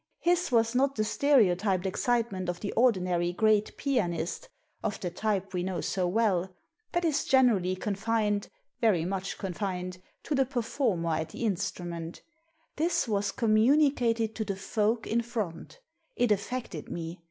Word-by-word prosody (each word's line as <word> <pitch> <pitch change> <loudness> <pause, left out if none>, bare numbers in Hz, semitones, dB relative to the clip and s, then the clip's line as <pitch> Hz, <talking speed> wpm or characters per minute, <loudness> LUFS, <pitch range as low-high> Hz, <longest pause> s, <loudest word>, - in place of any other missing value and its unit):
His 350 -2 +1
was 230 -1 +3
not 275 +2 +2
the 215 - +1
stereotyped 205 -7 +2
excitement 200 -2 0
of 175 0 -3
the 200 - -3
ordinary 180 -7 +2
great 215 +2 +2
pianist 175 - -1 0.2
— - - -41
of 210 -2 -2
the 180 - -3
type 195 0 -2
we 180 - -1
know 185 0 -2
so 185 -2 -1
well 190 -3 +1 0.4
That 345 0 +1
is 310 -3 +1
generally 225 -9 +3
coniSned 210 +1 -1
— - - -48
^very 185 -8 +3
much 195 0 -3
con 190 -3 -4
fined 185 -2 -4
— - - -43
to - - -2
the 270 -2 +2
performer 225 - 0
at 160 0 -3
the 230 - -4
instrument 175 -4 -3 0.5
This 325 -3 +1
was 200 -2 0
communicated 230 0 +3
to 220 - 0
the 200 -2 -3
folk 210 +4 0
in 235 +2 +1
front 220 - -5 0.4
It 245 -2 +2
affected 210 -5 -2
me. 170 +1 -5
210 Hz, 160 wpm, -29 LUFS, 180-235 Hz, 0.5 s, was